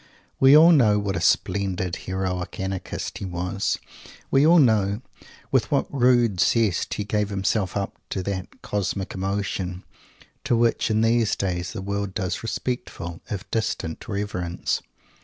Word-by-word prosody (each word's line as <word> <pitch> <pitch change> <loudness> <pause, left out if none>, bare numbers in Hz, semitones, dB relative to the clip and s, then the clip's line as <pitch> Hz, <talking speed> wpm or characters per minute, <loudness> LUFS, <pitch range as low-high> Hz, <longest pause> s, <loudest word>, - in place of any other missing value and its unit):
We 135 +2 +8
all 165 +3 +8
know 115 -10 +5
what 100 -2 -1
a - - -2
splendid 95 -2 +1
heroic 95 -1 -4
Anarchist 95 -1 -4
he - - -5
was. 90 +2 -2 0.5
We 140 +3 +5
all 170 +2 +7
know 110 - +3 0.5
with - - +2
what - - 0
rude 120 -6 +3
zest 110 -5 +2
he 105 - -2
gave 105 0 -1
himself 100 -1 0
up 100 -1 -2 0.2
to 95 - -3
that 95 -1 -5
"Cosmic 100 -1 -2
Emotion," 95 -1 -3 0.6
to 120 - +2
which 115 0 +2
in 110 0 +2
these 115 -1 +3
days 90 -2 -2
the 95 - -5
world 100 -1 -3
does 90 -4 -2
respectful, 115 -8 -4
if 100 -3 -5
distant, 110 -7 -2
reverence. 95 -4 -2
100 Hz, 145 wpm, -24 LUFS, 95-115 Hz, 0.6 s, We